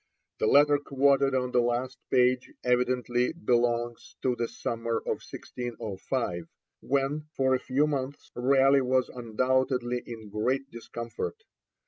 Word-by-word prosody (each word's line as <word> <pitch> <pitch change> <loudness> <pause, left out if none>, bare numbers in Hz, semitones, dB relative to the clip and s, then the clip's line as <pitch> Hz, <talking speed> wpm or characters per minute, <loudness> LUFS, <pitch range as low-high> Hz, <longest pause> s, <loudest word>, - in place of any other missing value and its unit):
The - - +2
letter 145 +2 +5
quoted 140 -1 +2
on 125 -1 0
the 125 - +4
last 120 +2 -1
page 125 0 +3
evidently 125 0 +1
belongs 120 -6 0
to 125 -2 +2
the 120 -1 -1
summer 115 0 -3
of - - -3
1605, 110 -5 -4 0.3
when, 140 +3 -1
for 130 -1 +2
a 130 - +2
few 135 +4 +1
months, 140 -2 -4
Raleigh 135 +2 +4
was 130 0 +1
undoubtedly 125 +1 0
in 110 -3 -9
great 130 +6 -1
discomfort. 115 - -6
125 Hz, 125 wpm, -28 LUFS, 120-135 Hz, 0.3 s, letter